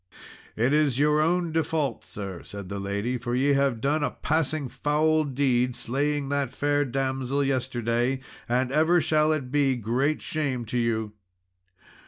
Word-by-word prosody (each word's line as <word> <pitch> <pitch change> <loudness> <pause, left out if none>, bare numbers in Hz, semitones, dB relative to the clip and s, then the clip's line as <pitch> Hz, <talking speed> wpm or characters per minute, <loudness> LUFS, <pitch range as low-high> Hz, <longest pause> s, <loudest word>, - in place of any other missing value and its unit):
"It 120 +5 +2
is 150 -4 +2
your 150 +1 +3
own 170 +1 +1
default, 155 -5 -1
sir," 95 -4 -7
said 100 -3 -8
the 100 0 -4
lady, 100 +6 -2
"for 120 0 -2
ye 140 +3 +3
have 140 -4 +1
done 145 +5 +1
a - - +1
passing 155 -2 -1
foul 155 +3 +1
deed 130 -3 +1
in - - -7
slaying 140 +4 -1
that 140 -3 -1
fair 145 0 +1
damsel 135 +1 -1
yesterday 125 -1 0 0.3
and 125 +1 +1
ever 160 +4 +4
shall 155 0 +2
it 140 -5 -2
be 140 -2 +2
great 125 +6 0
shame 135 -6 -2
to 120 +2 -2
you. 110 -2 -1
135 Hz, 160 wpm, -26 LUFS, 120-150 Hz, 0.3 s, ever